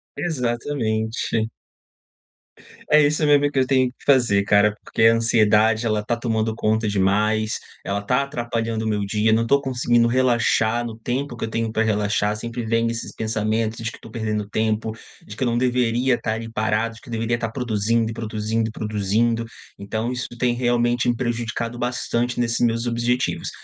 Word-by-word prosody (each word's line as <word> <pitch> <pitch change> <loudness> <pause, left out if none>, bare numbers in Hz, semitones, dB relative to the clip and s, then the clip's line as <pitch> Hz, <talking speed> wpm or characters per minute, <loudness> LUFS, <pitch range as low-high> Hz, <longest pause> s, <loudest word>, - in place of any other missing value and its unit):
Exatamente. 120 -6 -1 1.4
É 150 0 +7
isso 150 +1 +1
mesmo 145 -1 +4
que 135 - 0
eu 130 - +3
tenho 130 -1 +3
que 125 - -20
fazer 120 -8 +4
cara, 105 +1 +3
porque - - -1
a 115 0 +7
ansiedade 110 -1 +3
ela 110 -2 +1
está 120 +3 -1
tomando 115 -2 -1
conta 110 0 0
demais, 105 +2 +1 0.2
ela 100 +2 -2
tá 125 +6 +1
atrapalhando 115 -4 -3
o - - -1
meu 105 -1 0
dia, 105 +2 +2
não 115 +1 +3
estou 140 +4 +3
conseguindo 120 -3 +2
relaxar 120 -2 +2
no 115 -1 -6
tempo 125 +3 -3
que 115 - -3
eu - - -6
tenho 115 0 -2
pra 110 0 +1
relaxar, 105 -1 0
sempre 115 +2 -5
vem 115 +1 +1
esses 115 0 -4
pensamentos 110 0 -1
de 115 - -2
que - - -12
estou 115 - -13
perdendo 110 -2 -2
tempo, 110 0 0 0.3
de 105 - -9
que 125 - -2
eu - - +1
não 120 0 +1
deveria 125 0 +2
estar 115 -2 -2
ali 115 0 -6
parado, 110 +1 0
de 110 - -15
que - - -15
deveria 115 0 -1
estar 115 -1 -3
produzindo 115 -1 0
e - - -5
produzindo 110 0 -2
e - - -8
produzindo. 110 +2 0 0.3
Então 110 +4 -3
isso 125 -1 -3
tem 125 0 +2
realmente 120 0 +1
me 120 - +2
prejudicado 120 -1 -3
bastante 120 0 -1
nesses 115 -1 0
meus 115 0 0
objetivos. 120 +1 -1
115 Hz, 180 wpm, -22 LUFS, 110-120 Hz, 1.4 s, É